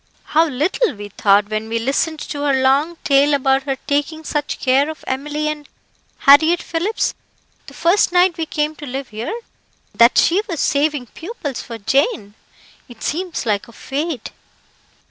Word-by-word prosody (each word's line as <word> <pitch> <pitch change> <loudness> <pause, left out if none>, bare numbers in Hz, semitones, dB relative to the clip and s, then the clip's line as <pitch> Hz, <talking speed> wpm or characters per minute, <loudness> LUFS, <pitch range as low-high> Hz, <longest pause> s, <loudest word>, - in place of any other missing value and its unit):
How 320 +2 +2
little 310 - 0
we 205 0 -8
thought 200 +1 +2
when 215 +1 -3
we 230 - -1
listened 280 +6 -1
to 290 - -5
her 285 -2 +2
long 280 +6 +2
tale 285 +1 +4
about 270 0 +2
her 270 - 0
taking 290 +2 -1
such 295 -1 -3
care 270 +3 +2
of 315 - -8
Emily 295 +3 -2
and 300 -1 -5 0.5
Harriett 315 +5 +5
Phillips, 355 +7 -1 0.5
the - - -12
first 350 +3 +3
night 360 0 +4
we 325 -1 -3
came 300 0 -1
to 290 - -8
live 265 +1 -5
here, 225 - -5 0.5
that 235 +1 +5
she 365 +5 +4
was 335 -4 -3
saving 290 -2 +1
pupils 295 - -6
for 230 - -8
Jane. 270 - 0 0.6
It 235 -2 -12
seems 345 -2 -3
like 210 -3 -1
a - - -14
fate." 285 -1 -4
290 Hz, 165 wpm, -19 LUFS, 260-320 Hz, 0.6 s, Harriett